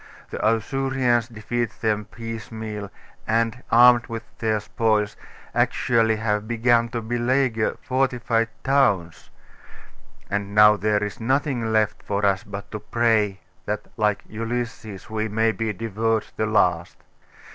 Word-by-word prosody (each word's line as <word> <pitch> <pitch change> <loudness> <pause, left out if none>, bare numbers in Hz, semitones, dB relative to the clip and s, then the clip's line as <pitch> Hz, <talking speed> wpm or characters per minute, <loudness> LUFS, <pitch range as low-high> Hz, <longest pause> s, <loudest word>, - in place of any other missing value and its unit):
The - - -5
Ausurians 120 +1 +1
defeat 120 0 -4
them 105 -2 0
piecemeal, 110 -2 -7 0.4
and, 115 +1 0
armed 120 0 +6
with 115 -1 -5 0.2
their 110 -1 +1
spoils, 110 -1 0 0.4
actually 115 -2 +2
have 105 -1 -1
begun 120 0 +2
to 115 0 -4
beleaguer 120 0 0
fortified 120 -3 0
towns; 100 - +1 1.0
and 100 0 -3
now 105 0 +8
there 105 0 +1
is 105 - -5
nothing 130 -1 0
left 110 -1 +1
for 100 0 -1
us, 100 -1 +2
but 100 0 -8
to 105 - -4
pray 110 -5 +1 0.3
that, - - -3
like 105 -2 0
Ulysses, 110 -3 -5
we 110 0 -2
may 110 +1 +1
be 110 0 -2
devoured 110 +1 -1
the 110 - -1
last. 90 -5 +1
110 Hz, 125 wpm, -23 LUFS, 105-120 Hz, 1.0 s, now